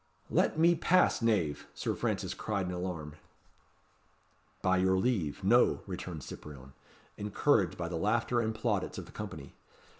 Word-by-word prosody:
"Let -, -, +2 dB
me 170 Hz, +2 st, +6 dB
pass, 175 Hz, -1 st, +3 dB
knave," 100 Hz, -11 st, +1 dB
Sir -, -, -1 dB
Francis -, -, -2 dB
cried 100 Hz, -3 st, -2 dB
in 90 Hz, -, -3 dB
alarm. 90 Hz, -4 st, -5 dB, 1.5 s
"By 95 Hz, 0 st, +3 dB
your 95 Hz, 0 st, +3 dB
leave, 95 Hz, -, 0 dB
no," 120 Hz, +6 st, +4 dB
returned 90 Hz, -5 st, -6 dB
Cyprien, 65 Hz, -1 st, -10 dB, 0.4 s
encouraged 105 Hz, -, +1 dB
by 85 Hz, -1 st, -3 dB
the 85 Hz, -1 st, -3 dB
laughter 120 Hz, +6 st, +1 dB
and 110 Hz, -1 st, -1 dB
plaudits 110 Hz, -4 st, -1 dB
of -, -, -6 dB
the -, -, -14 dB
company. 95 Hz, -10 st, -7 dB
95 Hz, 145 wpm, -31 LUFS, 85-115 Hz, 1.5 s, me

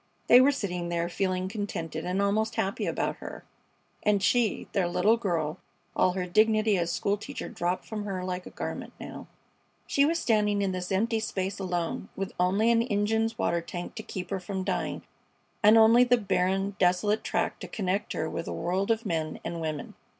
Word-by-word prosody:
They 245 Hz, -, +8 dB
were 275 Hz, +2 st, +5 dB
sitting 180 Hz, -9 st, -3 dB
there, 170 Hz, 0 st, 0 dB
feeling 185 Hz, 0 st, -1 dB
contented 190 Hz, -6 st, -4 dB
and 180 Hz, +2 st, -1 dB
almost 220 Hz, +3 st, +1 dB
happy 195 Hz, +1 st, -1 dB
about -, -, -1 dB
her, -, -, -9 dB, 0.6 s
and 205 Hz, -2 st, +2 dB
she, 240 Hz, -4 st, +2 dB
their 195 Hz, -4 st, +1 dB
little 210 Hz, +6 st, +3 dB
girl 170 Hz, -7 st, -2 dB, 0.4 s
all 185 Hz, -, +3 dB
her 185 Hz, -1 st, -2 dB
dignity 215 Hz, +3 st, +3 dB
as 170 Hz, -2 st, 0 dB
school 200 Hz, +3 st, 0 dB
teacher 210 Hz, -, -6 dB
dropped 175 Hz, +1 st, -2 dB
from 210 Hz, -2 st, -5 dB
her 190 Hz, -3 st, -3 dB
like 180 Hz, 0 st, -4 dB
a -, -, -7 dB
garment -, -, -6 dB
now -, -, -8 dB, 0.6 s
she 280 Hz, -, +2 dB
was 325 Hz, +3 st, +2 dB
standing 210 Hz, -7 st, +2 dB
in 195 Hz, -, 0 dB
this 180 Hz, 0 st, -4 dB
empty 225 Hz, +4 st, +1 dB
space 190 Hz, -3 st, -3 dB
alone, 180 Hz, 0 st, -2 dB
with 195 Hz, -1 st, -4 dB
only 195 Hz, +6 st, +3 dB
an 230 Hz, 0 st, +4 dB
engine's 225 Hz, 0 st, 0 dB
water 170 Hz, 0 st, +1 dB
tank 175 Hz, +1 st, -6 dB
to -, -, -6 dB
keep 185 Hz, 0 st, -6 dB
her 195 Hz, -, -1 dB
from 190 Hz, +1 st, -4 dB
dying, 185 Hz, -1 st, -2 dB, 0.6 s
and 215 Hz, +2 st, +7 dB
only 225 Hz, +2 st, +7 dB
the 245 Hz, 0 st, +4 dB
barren, 195 Hz, -1 st, 0 dB
desolate 190 Hz, +4 st, +2 dB
track -, -, -1 dB
to -, -, -7 dB
connect 195 Hz, -1 st, -2 dB
her 160 Hz, -, -2 dB
with 165 Hz, -, -4 dB
the -, -, -4 dB
world 190 Hz, +4 st, -1 dB
of 225 Hz, 0 st, +1 dB
men 160 Hz, -4 st, -2 dB
and 170 Hz, -1 st, -4 dB
women. 155 Hz, -2 st, -4 dB
195 Hz, 190 wpm, -28 LUFS, 180-220 Hz, 0.6 s, They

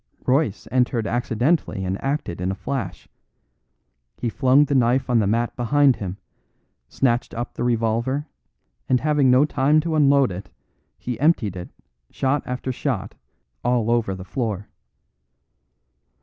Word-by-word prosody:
Royce 130 Hz, -5 st, +1 dB
entered 125 Hz, -3 st, +1 dB
accidentally 120 Hz, -, 0 dB
and 95 Hz, +1 st, -3 dB
acted 135 Hz, -, -2 dB
in 90 Hz, -, -1 dB
a 95 Hz, -, -2 dB
flash. 95 Hz, -, -5 dB, 1.1 s
He 120 Hz, -, -2 dB
flung 130 Hz, +5 st, +4 dB
the 140 Hz, -, -2 dB
knife 130 Hz, 0 st, +2 dB
on 120 Hz, -, +4 dB
the 105 Hz, -, +1 dB
mat 115 Hz, +3 st, 0 dB
behind 135 Hz, +2 st, +3 dB
him, 95 Hz, -1 st, -5 dB, 0.7 s
snatched 120 Hz, -2 st, 0 dB
up 120 Hz, +1 st, -4 dB
the -, -, -4 dB
revolver, 120 Hz, +4 st, 0 dB, 0.6 s
and 125 Hz, -, +4 dB
having 150 Hz, -3 st, +3 dB
no 130 Hz, +3 st, +5 dB
time 150 Hz, +1 st, +2 dB
to 165 Hz, +1 st, -3 dB
unload 140 Hz, -5 st, +4 dB
it, 90 Hz, +2 st, -7 dB, 0.6 s
emptied 125 Hz, -, +1 dB
it 90 Hz, -1 st, -7 dB, 0.4 s
shot 135 Hz, +1 st, 0 dB
after 125 Hz, +1 st, -3 dB
shot 120 Hz, -6 st, -3 dB, 0.5 s
all 120 Hz, -2 st, +1 dB
over 115 Hz, -5 st, +1 dB
the 95 Hz, 0 st, -9 dB
floor. 105 Hz, -3 st, -3 dB
125 Hz, 135 wpm, -22 LUFS, 110-135 Hz, 1.1 s, no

